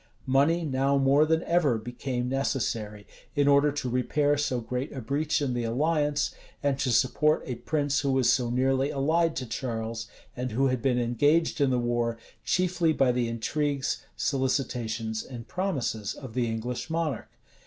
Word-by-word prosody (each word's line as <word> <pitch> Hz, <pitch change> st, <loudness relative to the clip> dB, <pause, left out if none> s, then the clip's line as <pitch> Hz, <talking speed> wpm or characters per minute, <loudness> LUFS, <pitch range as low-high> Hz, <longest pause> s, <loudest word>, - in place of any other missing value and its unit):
Money 145 Hz, +6 st, +3 dB
now 135 Hz, 0 st, +1 dB
more 140 Hz, +3 st, +4 dB
than 160 Hz, +1 st, +2 dB
ever, 165 Hz, -9 st, +2 dB
became 125 Hz, +2 st, -4 dB
necessary, 115 Hz, -6 st, -2 dB, 0.3 s
in 145 Hz, -1 st, +3 dB
order 140 Hz, +1 st, +5 dB
to 140 Hz, -2 st, -3 dB
repair 145 Hz, +4 st, +1 dB
so 140 Hz, -4 st, 0 dB
great 125 Hz, +4 st, -4 dB
a 135 Hz, -, -6 dB
breach 145 Hz, +5 st, 0 dB
in 130 Hz, -3 st, -1 dB
the 120 Hz, -1 st, -1 dB
alliance, 145 Hz, +4 st, 0 dB, 0.3 s
and 140 Hz, -1 st, +1 dB
to 130 Hz, -, +1 dB
support 150 Hz, +6 st, +2 dB
a 125 Hz, -, -3 dB
prince 145 Hz, -2 st, +1 dB
who 140 Hz, -2 st, 0 dB
was 130 Hz, -2 st, +2 dB
so 125 Hz, -2 st, +3 dB
nearly 130 Hz, +2 st, +1 dB
allied 160 Hz, +4 st, +1 dB
to 130 Hz, -, -3 dB
Charles, 115 Hz, -2 st, -4 dB, 0.3 s
and 125 Hz, -2 st, -4 dB
who 135 Hz, +3 st, +2 dB
had 130 Hz, -2 st, -1 dB
been 125 Hz, -1 st, +2 dB
engaged 145 Hz, +7 st, +2 dB
in 140 Hz, -, +4 dB
the 125 Hz, -, +2 dB
war 120 Hz, -1 st, 0 dB, 0.3 s
chiefly 180 Hz, -3 st, +1 dB
by 135 Hz, -4 st, +3 dB
the 120 Hz, -1 st, 0 dB
intrigues, 140 Hz, +5 st, -1 dB
solicitations, 120 Hz, -5 st, -1 dB
and 120 Hz, -3 st, -9 dB
promises 135 Hz, -, -2 dB
of 130 Hz, -5 st, -9 dB
the 125 Hz, -1 st, 0 dB
English 120 Hz, +5 st, -4 dB
monarch. 160 Hz, -3 st, -2 dB
135 Hz, 165 wpm, -27 LUFS, 120-145 Hz, 0.3 s, order